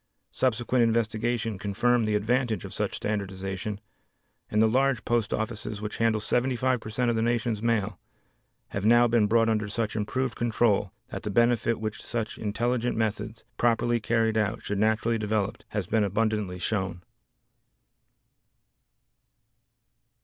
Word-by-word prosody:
Subsequent 125 0 +1
investigation 115 -1 0
confirmed 115 +4 +1
the 105 - +1
advantage 110 -1 0
of - - -8
such - - -2
standardization, 100 0 -3 0.7
and 105 - +1
the 110 - +6
large 130 +1 +1
post 120 -3 +1
offices 110 -2 -3
which 105 0 -5
handle 115 -1 +2
75 125 +3 +1
per 110 - -8
cent 120 +2 +1
of - - -1
the 110 - +1
nation's 115 -2 0
mail, 110 -4 0 0.7
have 100 - -4
now 120 +2 +6
been 115 -3 +3
brought 115 +1 +3
under 110 -2 +1
such 110 +1 -2
improved 125 +4 -1
control 115 -4 +1 0.2
that - - -5
the - - -4
benefit 115 +1 +2
which 110 -1 -4
such 115 -2 -4
intelligent 120 +3 -1
methods, 110 0 -2
properly 120 0 +2
carried 115 0 +1
out, 105 +1 -1
should 100 -1 -2
naturally 110 +2 +2
develop, 105 -1 -1
has 105 -3 -2
been 110 +4 +1
abundantly 105 -2 0
shown. 95 -1 -2
110 Hz, 140 wpm, -27 LUFS, 105-120 Hz, 0.7 s, the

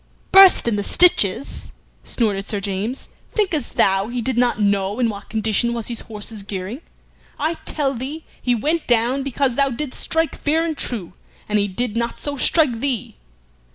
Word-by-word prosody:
"Burst 385 -8 +8
in 220 -3 +1
the 205 - -2
stitches!" 270 - +3 0.3
snorted 205 -4 -1
Sir 205 - -2
James. 200 +6 -4 0.3
"Thinkest 360 - -1
thou 195 +1 +3
he 245 +1 -4
did 250 +2 -1
not 240 -2 +1
know 200 0 0
in 240 -2 +2
what 200 -2 -8
condition 220 +2 0
was 230 -1 -4
his 235 - -4
horse's 215 0 -6
gearing? 200 - -6 0.6
I 310 +2 -1
tell 280 -3 0
thee 275 +6 -6 0.2
he 245 -1 +1
went 310 +8 -1
down 240 +3 +2
because 270 -1 -1
thou 280 -1 +3
didst 260 +2 -5
strike 325 0 0
fair 320 +3 0
and 320 -2 -2
true, 210 -11 -3 0.3
and 210 0 +1
he 205 - +1
did 215 +3 -3
not 235 0 -2
so 290 -1 -4
strike 275 -3 +3
thee. 255 - -3
240 Hz, 175 wpm, -20 LUFS, 210-280 Hz, 0.6 s, Burst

